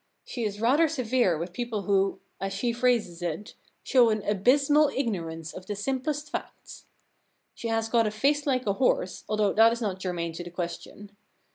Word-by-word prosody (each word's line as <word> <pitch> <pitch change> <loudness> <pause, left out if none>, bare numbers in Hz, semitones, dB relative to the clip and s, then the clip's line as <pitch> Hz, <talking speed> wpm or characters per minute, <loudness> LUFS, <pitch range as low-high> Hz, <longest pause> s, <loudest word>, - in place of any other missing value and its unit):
She 240 - -5
is 205 -1 -3
rather 275 +9 +4
severe 250 - +1
with 170 +3 -5
people 235 -2 -3
who, 195 0 +1 0.2
as 195 0 -3
she 235 +4 -1
phrases 235 -8 +1
it, 175 +5 -4 0.3
show 245 -3 +4
an 215 -2 -1
abysmal 275 +9 +3
ignorance 165 - -3
of 185 - -10
the 205 - -3
simplest 270 +7 -3
facts. - - -7 0.7
She 235 - -6
has 225 0 0
got 230 -1 +2
a - - -1
face 285 +7 +1
like 255 -2 +1
a 200 - +1
horse, 200 -5 0
though 215 -1 +1
that 225 +1 +6
is 235 - -2
not 200 -5 -2
germane 175 -3 -3
to 175 - -6
the 175 - -8
question. 175 +4 -7
215 Hz, 180 wpm, -27 LUFS, 190-250 Hz, 0.7 s, that